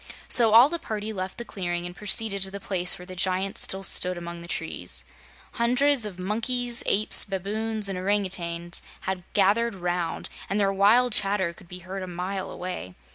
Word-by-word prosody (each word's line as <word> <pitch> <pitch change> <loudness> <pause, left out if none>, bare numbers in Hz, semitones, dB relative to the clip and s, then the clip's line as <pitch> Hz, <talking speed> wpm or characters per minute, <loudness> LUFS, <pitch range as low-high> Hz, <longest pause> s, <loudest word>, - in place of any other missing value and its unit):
So 230 -3 +3
all 235 +4 +9
the 340 +3 -3
party 215 -3 -4
left 185 -1 -5
the 235 - -6
clearing 175 -4 -4
and 175 0 -7
proceeded 210 0 +2
to 195 - 0
the 200 +1 -7
place 180 -2 0
where 180 - -11
the 185 0 -9
giants 190 +2 +1
still 190 0 0
stood 180 0 +4
among 170 0 -7
the 170 - -9
trees. 90 - -3 0.5
Hundreds 250 +1 +2
of 190 -4 -9
monkeys, 235 +5 -1
apes, 210 +2 +4
baboons 210 +2 -1
and 190 -2 -3
orangoutangs 180 -3 -1 0.2
had 190 -1 -3
gathered 210 +3 +2
round, 175 -2 -3 0.2
and 200 - 0
their 195 -1 +2
wild 220 +5 +4
chatter 195 -4 +3
could 175 - -17
be 180 +1 -7
heard 190 +1 -5
a 185 - -5
mile 185 +2 -4
away. 180 - -6
195 Hz, 185 wpm, -26 LUFS, 180-215 Hz, 0.5 s, all